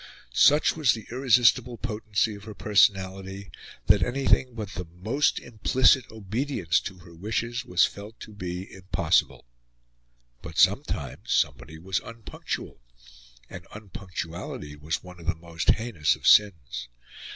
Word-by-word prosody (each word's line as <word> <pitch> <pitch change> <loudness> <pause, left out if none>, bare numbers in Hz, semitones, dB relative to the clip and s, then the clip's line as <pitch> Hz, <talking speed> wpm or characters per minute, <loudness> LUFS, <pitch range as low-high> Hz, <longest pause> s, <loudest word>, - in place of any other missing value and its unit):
Such 150 - +5
was 150 -6 +3
the 110 -2 -7
irresistible 125 -1 +3
potency 110 -2 -1
of 100 0 -11
her 110 -2 -9
personality, 95 -1 +1 0.3
that - - +5
anything 130 -1 +1
but 105 -4 -5
the 90 -3 -6
most 125 +8 +1
implicit 125 +2 +2
obedience 110 - -1
to 95 - -8
her 85 - -14
wishes 110 +7 -3
was 90 +1 +4
felt 105 +2 -9
to 110 - -10
be 90 -1 -6
impossible; 95 -1 0 1.0
but - - -9
sometimes - - +1
somebody 80 +1 0
was 95 +3 -2
unpunctual; 115 - -7 0.7
and 90 +3 -10
unpunctuality 85 -7 -7
was 75 +1 -4
one 90 -1 -12
of 85 - -12
the 85 - +1
most 80 -1 -4
heinous 110 -10 +2
of - - -13
sins. 65 -12 +3
100 Hz, 130 wpm, -26 LUFS, 90-115 Hz, 1.0 s, Such